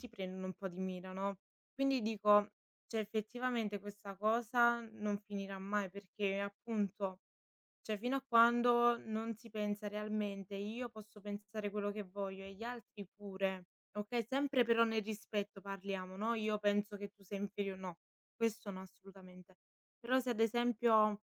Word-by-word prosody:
ti 250 - -9
prendono 190 -4 -5
un 185 - -4
po' 195 - -6
di 180 0 -8
mira, 185 0 -4
no. 195 +1 -2 0.4
Quindi 270 -2 +2
dico, 210 -1 +5 0.4
cioè 225 - -1
effettivamente 220 0 -1
questa 205 0 -9
cosa 235 +3 +4
non 210 -1 -1
finirà 195 -1 -5
mai, 200 0 0
perché 200 +1 -2
appunto 200 -2 -2 0.6
cioè, 215 -1 -2
fino 245 +6 0
a 270 - -5
quando 240 0 +7
non 225 0 -3
si 230 +2 -15
pensa 210 -1 -2
realmente: 205 -2 -3
"Io 220 +5 -3
posso 215 -2 -13
pensare 205 +1 -4
quello 205 0 -1
che 210 0 -4
voglio 195 0 -5
e 195 0 -8
gli 205 +4 -9
altri 230 -4 -7
pure", 190 -2 -2 0.3
okay, 220 +3 -1
sempre 270 0 +3
però 230 0 +6
nel 225 -1 +2
rispetto 205 -1 -3
parliamo, 195 -1 -4
no: 220 +3 +1
"Io 215 -1 +1
penso 205 0 +2
che 200 0 -5
tu 200 -1 -22
sei 200 +1 -5
inferio" 200 -1 -2
no, 185 -3 -6 0.4
questo 230 -1 0
no, 185 -1 -6
assolutamente. 185 -1 -14 0.4
Però, 255 +1 +3
se 250 -1 0
ad 225 - -2
esempio 225 -2 +4
210 Hz, 160 wpm, -38 LUFS, 195-225 Hz, 0.6 s, quando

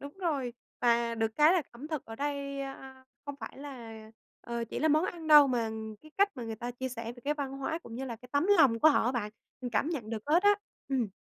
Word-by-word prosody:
Đúng 285 0 -8
rồi, 280 -8 0 0.3
và 235 -1 +3
được 225 -1 -1
cái 305 +2 +6
là 365 -3 +3
ẩm 255 +6 -9
thực 310 -4 -3
ở 225 - -9
đây, 280 0 -3
a, 265 -1 -8 0.2
không 285 -1 -5
phải 225 - -7
là, 255 -6 -8 0.5
ờ, 235 -1 -3
chỉ - - -5
là 315 - +2
món 310 +3 +4
ăn 340 -3 -5
đâu 300 -2 +9
mà 235 -4 0 0.3
cái 310 - -15
cách 400 +1 +6
mà 245 - -5
người 225 -1 -5
ta 240 +2 -4
chia 260 +2 -4
sẻ 230 -2 -6
về 245 - -14
cái 295 +1 +1
văn 280 -2 -4
hóa, 275 +4 -3
cũng 230 - -11
như 260 +3 -4
là 240 -3 -5
cái 250 +2 -15
tấm 285 +4 +2
lòng 255 -7 +6
của 315 - +8
họ 290 - +3
á 245 - +1
bạn. 220 -4 -2 0.3
Mình 245 -2 -4
cảm 260 - +1
nhận 245 -10 -4
được 220 -2 -3
hết 330 +5 +4
á. 410 0 +6 0.3
Ừm. 260 -5 0
265 Hz, 260 wpm, -30 LUFS, 235-295 Hz, 0.5 s, đâu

